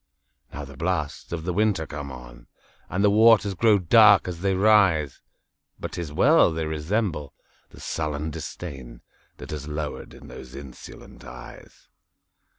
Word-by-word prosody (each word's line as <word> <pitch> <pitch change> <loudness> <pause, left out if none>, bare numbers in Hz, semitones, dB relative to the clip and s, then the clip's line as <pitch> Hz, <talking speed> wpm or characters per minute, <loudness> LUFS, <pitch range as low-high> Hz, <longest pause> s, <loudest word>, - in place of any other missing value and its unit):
Now 75 0 -7
the 70 0 -13
blasts 75 -1 -3
of 85 -2 -4
the 90 +1 -2
winter 105 -4 +1
come 70 -2 -7
on, - - -12 0.4
And 95 +4 -1
the 100 - +4
waters 110 -1 +5
grow 105 +2 +3
dark 100 +2 +5
as 85 -2 -6
they 95 0 +1
rise! 95 -9 +3 0.6
But - - -6
't - - -5
is 80 -4 -6
well!—they 80 +2 +3
resemble 80 - -3 0.3
the - - -16
sullen 75 -1 -3
disdainThat 65 -7 -10
has 75 -1 -6
lowered 75 0 -6
in - - -14
those 65 +1 -11
insolent 70 -2 -12
eyes. 60 0 -13
80 Hz, 145 wpm, -24 LUFS, 70-95 Hz, 0.6 s, waters